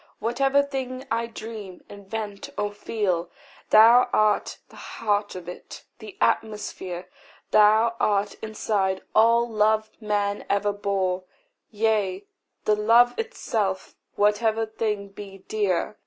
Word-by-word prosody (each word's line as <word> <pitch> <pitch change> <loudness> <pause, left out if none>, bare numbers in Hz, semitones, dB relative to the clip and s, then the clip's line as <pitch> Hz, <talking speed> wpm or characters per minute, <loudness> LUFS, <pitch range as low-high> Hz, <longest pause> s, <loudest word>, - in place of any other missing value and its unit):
Whatever 270 +5 +2
thing 265 -2 -5
I 230 +1 0
dream, 220 -5 -9
invent, 205 0 -7
or 205 0 -1
feel, 200 -5 -2 0.4
Thou 235 +3 +7
art 215 -1 +1
the - - -17
heart 205 -2 -2
of 180 -2 -8
it, 180 - -9 0.2
the 215 -2 -11
atmosphere. 190 -4 -2 0.4
Thou 215 +2 +5
art 205 -1 +1
inside 205 -3 -1
all 230 +2 +4
love 215 -1 +1
man 205 -1 -1
ever 205 +1 +1
bore; 190 -2 -1 0.4
Yea, 205 -3 0 0.4
the 210 - +3
love 230 +3 +5
itself, 215 - -2 0.2
whatever 220 +2 +2
thing 210 -2 -3
be 195 -1 -11
dear. 210 -1 -1
210 Hz, 115 wpm, -25 LUFS, 200-225 Hz, 0.4 s, Thou